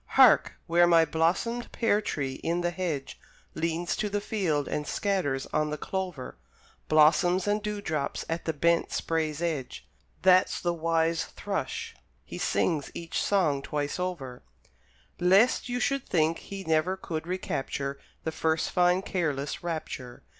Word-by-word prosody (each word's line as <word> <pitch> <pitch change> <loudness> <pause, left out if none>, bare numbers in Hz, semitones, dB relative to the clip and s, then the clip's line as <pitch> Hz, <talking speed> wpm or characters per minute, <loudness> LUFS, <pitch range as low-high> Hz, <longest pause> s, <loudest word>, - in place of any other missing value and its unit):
Hark! - - +7
where 175 +1 +4
my 165 -1 +6
blossomed 180 +10 0
pear 215 -3 +2
tree 135 -9 -3
in 170 +1 0
the 175 0 0
hedge 170 -7 -4 0.3
Leans 165 +1 -1
to 210 - -1
the 205 +1 -1
field 180 -9 -1
and 150 - -3
scatters 180 -10 -1
on 155 0 +1
the 150 - -3
clover 180 -5 -5 0.5
Blossoms 175 +5 +4
and 210 +1 +1
dewdrops 205 -9 -3
at 165 +1 -3
the 160 - +1
bent 170 +2 +1
spray's 160 -1 -1
edge 155 -7 -3 0.4
That's 185 0 +5
the 175 -1 0
wise 165 0 +1
thrush; 455 - -4 0.3
he - - -7
sings 155 -5 0
each 170 -1 -3
song 160 -9 +2
twice 145 +3 -3
over, 155 -9 -4 0.8
Lest 195 +9 +4
you 245 0 -1
should 275 +1 -1
think 160 -1 +2
he 195 -1 -7
never 160 +3 +1
could 165 -3 -5
recapture 140 -6 -3 0.2
The 160 - -2
first 160 0 0
fine 180 +1 +3
careless 150 -7 -2
rapture! 155 -7 -5
165 Hz, 145 wpm, -28 LUFS, 155-185 Hz, 0.8 s, Hark